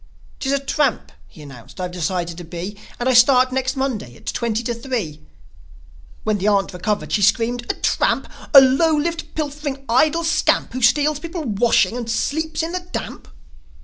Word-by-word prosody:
"'Tis 265 - -2
a 280 - +3
tramp," 275 -2 -1 0.2
he 155 - -14
announced, 135 +2 -13
"I've 180 -1 -3
decided 175 0 -2
to - - -7
be; 175 +4 -6 0.2
And 245 - -1
I 260 - +3
start 255 +1 +5
next 260 +1 -1
Monday 245 - -3
at - - -18
twenty 230 0 -2
to 235 - -2
three.. 235 - -4 0.5
." 65 0 -25
When 215 -1 0
the 195 - -1
aunt 200 -2 +2
recovered 205 +4 -2
she 210 - +1
screamed, 240 +4 +1
"A - - -8
tramp? - - 0 0.3
A 275 - +13
low 290 +4 +3
lived, 330 +2 -3
pilfering, 290 -2 -4
idle 310 +8 +2
scamp, 325 0 +1
Who 255 - -4
steals 290 +5 +3
people's 315 - -5
washing, 240 0 +3
and 240 -2 -5
sleeps 315 +7 -1
in 330 - -3
the 365 - -2
damp?" 355 0 -7
245 Hz, 180 wpm, -20 LUFS, 200-290 Hz, 0.5 s, A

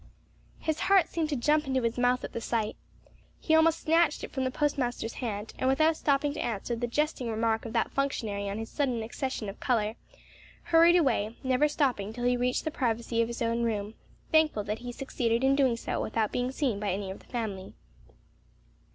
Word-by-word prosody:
His 315 0 -2
heart 390 -4 +5
seemed 320 -2 -1
to 295 - 0
jump 300 +4 +2
into 260 -2 0
his 230 0 0
mouth 250 +1 +2
at - - -6
the 230 - -4
sight. 225 -2 -1 0.6
He 320 - 0
almost 320 +1 +4
snatched 325 -1 +2
it - - -6
from 265 -2 -2
the - - +1
postmaster's 255 -5 -1
hand, 215 -3 -4
and 260 - +2
without 310 +4 +3
stopping 285 -1 +1
to - - -6
answer 235 +1 -2
the 240 +1 -2
jesting 280 -1 -1
remark 225 0 0
of 225 - -8
that - - +1
functionary 215 -8 -2
on 200 - -3
his 225 0 -4
sudden 255 -6 0
accession 240 -1 -4
of 195 - -7
color, 220 -3 0 0.7
hurried 335 +1 +6
away, 240 -9 +1
never 260 +3 +3
stopping 255 -9 0
till 240 +1 -6
he 245 0 +3
reached 250 +1 0
the 315 - -2
privacy 230 -3 0
of 230 - +1
his 235 0 -4
own 230 +1 0
room, 215 -2 -1 0.4
thankful 315 -9 +3
that 210 +2 -3
he 245 0 -6
succeeded 240 -2 -1
in 270 +1 +4
doing 260 -4 +2
so - - -3
without 220 -1 -1
being 250 +1 -1
seen 260 -7 -1
by 205 -2 -1
any 190 0 -3
of 190 - -8
the - - -20
family. 205 -6 -5
245 Hz, 205 wpm, -29 LUFS, 225-285 Hz, 0.7 s, hurried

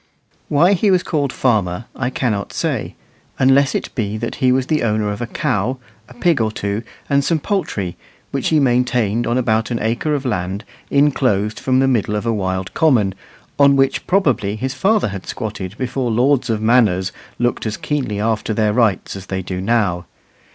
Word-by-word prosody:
Why 170 +7 +4
he 200 +2 +2
was 185 -2 +3
called 145 -5 -1
"farmer" 105 -6 0
I 125 -1 -1
cannot 110 -6 -2
say, - - -2 0.4
unless 135 +1 +4
it - - -3
be 105 -2 -2
that 115 +1 -4
he 130 -2 +3
was 130 0 +2
the 155 +2 0
owner 105 -2 0
of 105 - -5
a 120 - -2
cow, 130 -1 -1 0.3
a 125 - -14
pig 160 0 +2
or 110 -1 +1
two, 100 0 -3 0.3
and 140 -1 +2
some 165 +3 +1
poultry, 105 - -2 0.3
which 135 - -1
he 155 - +3
maintained 120 -4 +1
on 120 +2 +1
about 110 -3 +1
an 120 - -1
acre 120 +7 0
of 140 -1 -4
land 100 -3 -2 0.2
inclosed 125 -8 +2
from 130 -1 +1
the 135 - +3
middle 110 -5 +1
of 105 - -2
a 115 - +1
wild 95 -2 -2
common, 120 - +3 0.5
on 140 -1 +6
which 135 0 +1
probably 125 - +1
his 130 +4 -3
father 195 - +2
had 95 -1 -7
squatted 105 -3 -5
before 130 -1 -2
lords 125 +4 +2
of 110 -1 -1
manors 105 -6 +3 0.3
looked 120 -1 -1
as 110 - -3
keenly 130 -9 -2
after 110 0 -1
their 105 -1 +2
rights 110 -6 +1
as 95 -1 -9
they 95 -1 -3
do 90 0 -4
now. 95 -5 0
120 Hz, 185 wpm, -19 LUFS, 105-135 Hz, 0.5 s, on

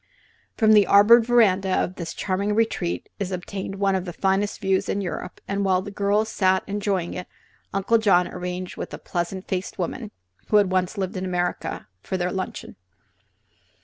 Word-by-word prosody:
From 220 -2 +4
the 210 -2 +6
arbored 220 +3 +7
veranda 200 -6 +4
of 185 -1 0
this 170 -3 -6
charming 200 +2 -1
retreat 220 -6 -1
is 195 -2 -3
obtained 190 +2 -5
one 195 0 +1
of 190 -1 -1
the 175 - -6
finest 195 +3 0
views 190 -2 0
in 200 - 0
Europe, 180 -1 -5
and 200 0 -1
while 185 -1 +2
the 205 - -7
girls 205 +2 +1
sat 190 -3 +2
enjoying 200 -3 -2
it 180 - -6 0.4
Uncle 200 +4 +2
John 180 -5 +4
arranged 180 0 -5
with - - -5
a - - -8
pleasant 180 +2 -4
faced 185 0 -3
woman 210 +5 -4 0.4
(who 210 - +4
had 200 -3 +3
once 185 +2 0
lived 190 +1 -2
in 185 - -3
America) 180 - -2
for 190 - -3
their 180 0 -1
luncheon. 190 -1 -5
190 Hz, 180 wpm, -24 LUFS, 185-205 Hz, 0.4 s, arbored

